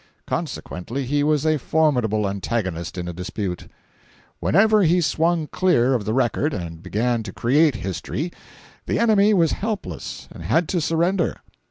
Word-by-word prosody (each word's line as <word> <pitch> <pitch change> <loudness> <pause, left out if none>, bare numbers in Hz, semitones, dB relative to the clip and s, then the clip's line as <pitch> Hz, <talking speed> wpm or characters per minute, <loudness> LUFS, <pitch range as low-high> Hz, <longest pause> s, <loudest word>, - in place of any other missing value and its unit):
Consequently 120 +10 -4
he 145 +3 +1
was 150 0 +1
a 155 -1 +2
formidable 125 -9 +1
antagonist 95 -3 -3
in 90 -1 -4
a 90 - -4
dispute. 90 +1 -4 0.7
Whenever 215 +3 +4
he 175 0 +4
swung 165 +1 +1
clear 150 -7 +2
of 115 -5 -1
the 110 - -1
record 135 +4 +1
and 85 -3 -6
began 115 +4 0
to 105 -3 -7
create 140 - +3
history, 110 - -4 0.6
the - - 0
enemy 215 -3 +4
was 170 -6 +3
helpless 215 -1 -4
and - - -10
had 120 - +1
to 175 - 0
surrender. 170 +3 0
140 Hz, 150 wpm, -22 LUFS, 105-170 Hz, 0.7 s, Whenever